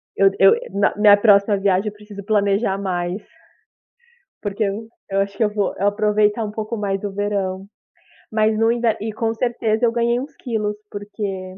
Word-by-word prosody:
Eu 195 0 +4
eu 195 - +7 0.2
na 200 0 +2
minha 210 -1 +6
próxima 205 -1 +4
viagem, 195 +1 +1
eu 210 - -3
preciso 210 -1 -11
planejar 200 -1 +1
mais 180 0 -3 1.2
porque 205 +1 -2
eu 210 +3 -3 0.2
eu 195 0 +1
acho 200 0 -4
que 225 - +2
eu 210 - +2
vou 205 -2 0
eu 200 - +2
aproveitar 210 +1 +1
um 210 - -4
pouco 220 +2 -4
mais 195 -1 -1
do 205 -1 -4
verão. 195 -2 -2 0.7
Mas 215 0 +2
no 225 +1 +3
inver 235 -2 +1
e 220 0 -3
com 225 0 -1
certeza 230 -1 0
eu 230 - +2
ganhei 235 +1 +1
uns 280 +4 -8
quilos, 215 -4 -3 0.2
porque 200 -2 -6
210 Hz, 180 wpm, -21 LUFS, 200-220 Hz, 1.2 s, eu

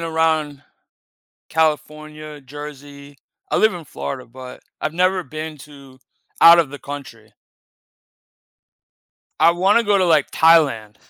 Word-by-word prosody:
around 160 -3 -1 0.9
California, 155 -1 -3
Jersey. 145 0 -11 0.3
I - - 0
live 220 -2 +3
in 170 -3 -9
Florida, 130 -2 -7
but 125 +1 -12 0.2
I've 155 - -3
never 185 +1 +1
been 155 +2 -8
to 135 -2 -16 0.4
out 170 +1 +9
of 150 -5 +1
the 145 - -10
country. 135 -6 -10 2.1
I 170 - +5
wanna 195 +6 +2
go 205 -1 +2
to, 185 - +2
like, 160 -5 +2
Thailand. 140 -11 +3
150 Hz, 120 wpm, -20 LUFS, 140-165 Hz, 2.1 s, out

